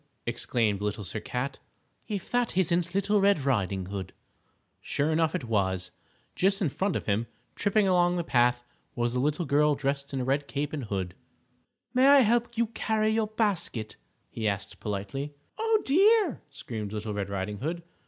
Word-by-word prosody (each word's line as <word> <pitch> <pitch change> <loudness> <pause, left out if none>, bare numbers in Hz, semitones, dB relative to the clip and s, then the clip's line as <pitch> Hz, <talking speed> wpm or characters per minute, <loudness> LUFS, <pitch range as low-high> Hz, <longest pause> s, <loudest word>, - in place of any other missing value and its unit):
exclaimed 105 -5 0
Little 105 0 -2
Sir 95 +4 -4
Cat, 125 +5 -4 0.5
"if 200 -3 -4
that 245 -6 0
isn't 175 0 +1
Little 200 +1 +2
Red 195 -8 +3
Riding 100 -7 0
Hood." 95 -1 -6 0.7
Sure 145 +3 -1
enough 160 0 +2
it - - -2
was. 95 -5 0 0.4
Just 195 +2 +2
in 180 - +1
front 190 +7 -1
of - - -2
him, 110 +3 0 0.3
tripping 205 0 +2
along 175 -1 +3
the 175 - -1
path, 120 -4 +2 0.3
was 120 0 0
a 125 - 0
little 150 +6 0
girl 150 +1 +3
dressed 140 0 -2
in 135 - -2
a - - -1
red 140 +2 0
cape 145 +1 -3
and 140 -5 -3
hood. 95 -4 -3 0.8
"May 260 +1 +5
I 280 0 +8
help 235 0 +1
you 235 - +3
carry 220 -1 0
your 220 0 +1
basket?" 185 - -1 0.4
he 110 -1 -2
asked 100 -1 -3
politely. 105 +8 -4 0.2
"Oh, 445 -1 +2
dear!" 390 - +4
screamed 110 -7 -6
Little 105 0 -3
Red 100 -1 -3
Riding 100 +1 -3
Hood. 165 +5 -3
145 Hz, 175 wpm, -28 LUFS, -, 0.8 s, I